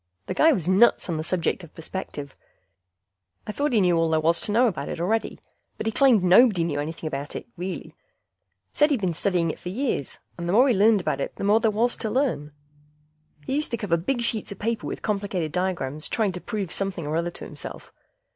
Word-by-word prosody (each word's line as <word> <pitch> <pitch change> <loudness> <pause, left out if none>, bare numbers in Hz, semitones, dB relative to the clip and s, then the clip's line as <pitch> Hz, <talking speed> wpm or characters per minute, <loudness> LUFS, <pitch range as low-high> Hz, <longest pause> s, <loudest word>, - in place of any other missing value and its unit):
The - - -3
guy 320 - +5
was 180 - -1
nuts 190 +2 +4
on 165 - -1
the 155 - -3
subject 180 +2 -1
of 165 - -14
perspective. 155 -4 -7 1.1
I - - -4
thought 290 +7 -1
he 230 - +3
knew 180 -2 +3
all 165 0 +2
there 160 0 +2
was 165 +2 +3
to - - 0
know 235 +4 +4
about 165 - -2
it - - -5
already, 215 +6 -1 0.4
but - - -5
he 225 - +1
claimed 245 -6 +4
nobody 185 0 +5
knew 150 -3 -2
anything 160 +2 -4
about 145 0 -5
it, - - -5
really. 185 +1 -6 0.8
Said 295 +1 +4
he'd 280 -5 +1
been 185 -4 -1
studying 170 -1 0
it - - -11
for 180 - -6
years, 220 - -2 0.2
and 170 0 -3
the - - +1
more 250 +6 +6
he 255 - +4
learned 210 0 +4
about 140 -5 -2
it - - -4
the - - -6
more 205 +2 +4
there 225 - +2
was 230 +3 +1
to 220 - -3
learn. 220 - -1 0.9
He - - -3
used 300 +2 0
to 235 - -2
cover 205 -7 0
big 240 +10 -1
sheets 225 -3 0
of 200 - -7
paper 230 +1 -2
with - - -6
complicated 195 -6 -2
diagrams 165 -5 -2
trying 220 -4 +1
to 180 0 -7
prove 200 -5 -4
something 195 -5 -2
or 150 +2 -2
other 170 +1 0
to - - -9
himself. - - -9
190 Hz, 225 wpm, -25 LUFS, 165-225 Hz, 1.1 s, more